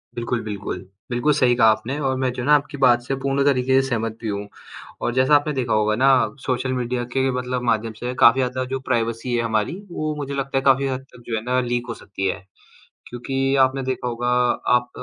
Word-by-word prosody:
बिल्कुल, 120 0 -2
बिल्कुल, 105 -3 -5 0.3
बिल्कुल 120 +5 +1
सही 125 -1 +4
कहा 115 -2 +5
आपने 115 +6 -3
और 130 - 0
मैं 130 -1 0
जो 125 - -5
है - - -4
ना, 150 - +6
आपकी 145 0 -2
बात 120 -2 +5
से 130 +3 -3
पूर्ण 135 +1 0
तरीके 130 -1 +3
से 135 - -4
सहमत 115 -2 -2
भी 115 - -4
हूँ। 100 0 -4 0.5
और 120 - -1
जैसा 130 +3 +4
आपने 145 +1 +2
देखा 130 -4 -1
होगा 110 0 +2
ना 130 +4 +4 0.4
सोशल 130 0 -1
मीडिया 125 -1 -2
के 135 0 +2
मतलब 125 0 -2
माध्यम 115 -1 0
से 125 +1 -3
काफ़ी 120 +3 +6
ज़्यादा 130 0 -1
जो 135 - -1
प्राइवेसी 115 0 -1
है 120 - +1
हमारी, 110 +6 -1 0.2
वो 155 -2 -3
मुझे 140 -1 -5
लगता 135 0 -2
है 135 - +2
काफ़ी 135 0 +4
हद 130 -1 -3
तक 120 - -14
जो 115 - -2
है 110 - -2
ना 125 +1 +1
लीक 120 0 -2
हो 115 - -2
सकती 95 -1 -5
है। 95 - -4 0.6
क्योंकि 135 +2 -1
आपने 130 +1 -3
देखा 130 -1 -3
होगा 120 0 -2 0.5
आप 120 0 -6
125 Hz, 230 wpm, -22 LUFS, 120-135 Hz, 0.6 s, ना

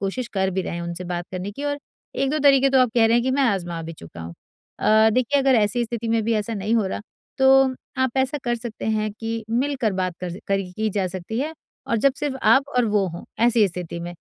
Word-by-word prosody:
कोशिश 200 +6 -3
कर 190 -1 +1
भी 190 0 -1
रहे 170 - -4
हैं 170 - -4
उनसे 170 +1 -5
बात 175 -1 -3
करने 185 +2 -4
की 280 +8 -6
और 290 0 -1 0.4
1-2 275 +3 0
तरीके 275 -2 +5
तो 265 - +4
आप 250 - +3
कह 230 -2 +5
रहे 230 - +3
हैं 240 - +2
कि 260 - 0
मैं 275 +1 +2
आजमा 175 -8 0
भी 165 +1 -6
चुका 85 - -12
हूँ। 85 +1 -8 0.4
अ, 220 +1 +5
देखिए 255 +4 +2
अगर 270 -1 +4
ऐसी 230 +2 +2
स्थिति 230 0 -4
में 225 0 +2
भी 230 - +1
ऐसा 215 +1 -2
नहीं 210 +3 -1
हो 215 -4 +2
रहा, - - -4 0.4
तो 265 0 +5 0.2
आप 260 -1 0
ऐसा 265 +2 +1
कर 240 -1 +1
सकते 235 -1 -7
हैं 215 -1 0
कि 225 +1 -5
मिलकर 250 -2 0
बात 185 -1 -2
कर 180 -1 -4
स 175 - -7
करी 195 -2 0
की 220 +3 -1
जा 195 -2 0
सकती 185 +5 -5
है 305 +3 -2 0.3
और 230 - +1
जब 275 +3 +3
सिर्फ 280 -2 -2
आप 275 +1 +4
और 250 - +4
वो 205 -3 +1
हों 170 0 -8 0.2
ऐसी 235 -3 +4
स्थिति 170 -1 -6
में। 175 +1 -6
225 Hz, 250 wpm, -23 LUFS, 190-260 Hz, 0.4 s, तरीके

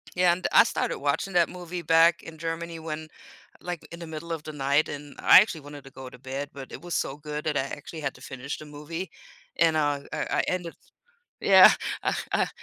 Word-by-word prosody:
Yeah, 180 -1 +4
and 180 +2 -1
I - - +8
started - - -2
watching 195 - -1
that 170 -2 +4
movie 180 -1 -6
back 165 +1 +4
in 160 -1 -11
Germany 165 0 -4
when, 155 -1 -6 0.5
like, 175 -2 -6
in 170 - -8
the 170 - -7
middle 160 +1 -6
of 160 -2 -4
the 155 - -6
night 140 +1 +1
and 145 -1 -8
I - - +9
actually 180 -7 -1
wanted 145 -1 -11
to 135 - -12
go 130 -1 -9
to 125 - -13
bed 135 +2 -5
but 135 -2 -10
it - - -7
was 175 -1 -5
so 135 - -1
good 150 0 -6
that 150 -2 -1
I 135 - +2
actually 145 +3 -7
had 135 -2 -3
to - - -16
finish 130 +2 -6
the 155 - -9
movie 155 +4 -7 0.5
and, 165 -1 +3
uh, 145 -2 +1
I - - -3 0.2
I - - +2
ended 175 -2 -2 0.7
Yeah, - - +9 0.3
I - - 0 0.2
I - - +2
155 Hz, 225 wpm, -26 LUFS, 145-170 Hz, 0.7 s, I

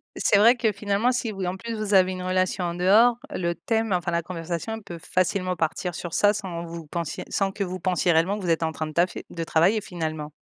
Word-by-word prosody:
Et - - -7
c'est 205 - +4
vrai 230 +4 +7
que 220 -3 +1
finalement, 205 +5 +1
si 240 -3 -1
vous 195 -2 -4
en 180 - -2
plus 230 +4 -6
vous 215 -2 -2
avez 185 -1 +5
une 185 0 -5
relation 185 0 0
en 170 - -2
dehors, 215 +7 +5
le 170 -1 -1
thème, 225 +1 -1
enfin, 175 -1 -1
la 170 0 +1
conversation 175 +6 -5
peut 175 -4 -8
facilement 185 0 0
partir 170 +1 -2
sur 170 -2 -6
ça, 205 0 +4
sans 180 -5 -5
vous 165 -1 -8
pensiez 165 +1 -4
sans 195 -1 0
que 200 - -2
vous 185 0 -5
pensiez 180 -1 +1
réellement 170 +6 +2
que 200 - -7
vous 175 - -2
êtes 165 0 +2
en 160 0 -1
train 155 0 -3
de - - -7
taffer, 175 +3 0
de 165 -1 -4
travailler, 170 +7 +3
finalement. 155 -5 -5
185 Hz, 245 wpm, -25 LUFS, 170-205 Hz, -, vrai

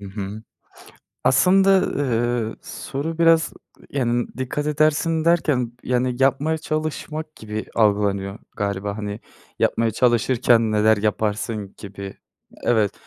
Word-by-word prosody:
Hı 100 - -8
hı. 100 +2 -6 0.8
Aslında, 190 +7 +5 0.2
eee, 120 -4 0
soru 155 +4 -5
biraz, 165 -1 +4 0.3
ııı, - - -19
yani, 120 -3 0
dikkat 130 +3 -2
edersin 155 +2 +2
derken, 150 -8 +2
yani, 125 0 0
yapmaya 145 +4 +2
çalışmak 155 0 -4
gibi 110 0 -5
algılanıyor 100 -2 +1 0.2
galiba 100 0 -2
hani. 105 0 -5 0.4
Yapmaya 115 -1 +2
çalışırken 120 -1 +3
neler 110 +1 +4
yaparsın 105 0 -2
gibi 100 -1 -8 0.5
Evet, 110 -4 +2
120 Hz, 110 wpm, -22 LUFS, 105-150 Hz, 0.8 s, Aslında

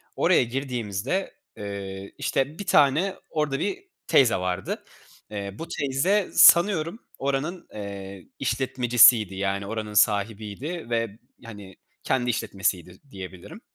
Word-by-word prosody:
oraya - - +4
girdiğimizde, 125 - -3 0.2
eee, 100 -1 -7
işte, 140 +6 -1
bir 200 - -5
tane 160 +5 +3
orada 150 -3 -1
bir 390 0 -3 0.2
teyze 125 -4 +5
vardı. 90 0 -3 0.5
Eee, 100 -1 -5
bu 165 - -6
teyze 160 +9 0
sanıyorum 170 +2 +5 0.2
oranın, 140 +6 -2
eee, 100 -2 -8
işletmecisiydi, 120 -4 +4
yani, 100 +1 -2
oranın 110 -1 -5
sahibiydi 110 - 0
ve, 115 -2 -2 0.3
hani, 100 -4 -11 0.3
kendi 125 -2 0
işletmesiydi 95 -5 -2
diyebilirim. 95 -2 -10
115 Hz, 110 wpm, -25 LUFS, 100-140 Hz, 0.5 s, teyze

